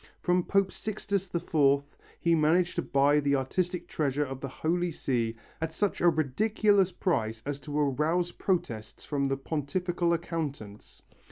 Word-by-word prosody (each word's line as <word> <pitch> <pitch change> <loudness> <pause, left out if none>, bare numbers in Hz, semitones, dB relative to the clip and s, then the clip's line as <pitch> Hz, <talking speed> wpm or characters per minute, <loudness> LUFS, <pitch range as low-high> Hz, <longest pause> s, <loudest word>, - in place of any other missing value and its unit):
From 180 0 +2
Pope 195 0 +2
Sixtus 200 -3 -3
IV 140 -4 +3 0.4
he 170 - +2
managed 165 +3 +3
to - - +2
buy 140 +2 +3
the 140 -1 +2
artistic 175 +6 -1
treasure 145 -1 0
of 135 -1 -7
the 135 - -3
Holy 170 +6 -1
See 120 -7 -1 0.3
at 160 0 -1
such 205 +4 -1
a 175 - +6
ridiculous 195 - +2
price 115 - -1
as 145 0 -3
to 145 0 -3
arouse 155 +5 +1
protests 120 - -2
from 140 -2 -1
the 135 0 0
Pontifical 170 +5 -1
accountants. 150 -11 -4
155 Hz, 150 wpm, -29 LUFS, 140-180 Hz, 0.4 s, a